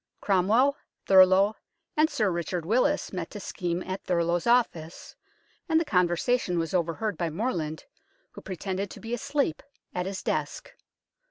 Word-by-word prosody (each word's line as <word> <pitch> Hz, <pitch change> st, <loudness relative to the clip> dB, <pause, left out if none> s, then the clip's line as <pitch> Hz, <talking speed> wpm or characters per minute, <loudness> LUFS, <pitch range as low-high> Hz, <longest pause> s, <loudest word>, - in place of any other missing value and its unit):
Cromwell, 220 Hz, +9 st, +3 dB, 0.3 s
Thurloe, 190 Hz, +2 st, +6 dB, 0.4 s
and 310 Hz, +1 st, +4 dB
Sir 220 Hz, -, 0 dB
Richard 170 Hz, 0 st, -3 dB
Willis 250 Hz, -, +1 dB
met 180 Hz, -3 st, -4 dB
to 205 Hz, -, -8 dB
scheme 180 Hz, -3 st, -3 dB
at 185 Hz, +1 st, -5 dB
Thurloe's 170 Hz, 0 st, 0 dB
office, 185 Hz, -9 st, 0 dB, 0.5 s
and 320 Hz, 0 st, +4 dB
the 330 Hz, -, -1 dB
conver 180 Hz, -, +2 dB
sation 240 Hz, -5 st, 0 dB
was 165 Hz, +2 st, -2 dB
overheard 180 Hz, +3 st, -1 dB
by 170 Hz, -2 st, 0 dB
Morland, 160 Hz, -, -3 dB, 0.5 s
who -, -, -11 dB
pretended 190 Hz, +1 st, -4 dB
to -, -, -10 dB
be 230 Hz, +1 st, -6 dB
asleep 280 Hz, -, -1 dB, 0.3 s
at 180 Hz, 0 st, -2 dB
his 195 Hz, 0 st, -5 dB
desk. -, -, -3 dB
190 Hz, 150 wpm, -27 LUFS, 175-230 Hz, 0.5 s, Thurloe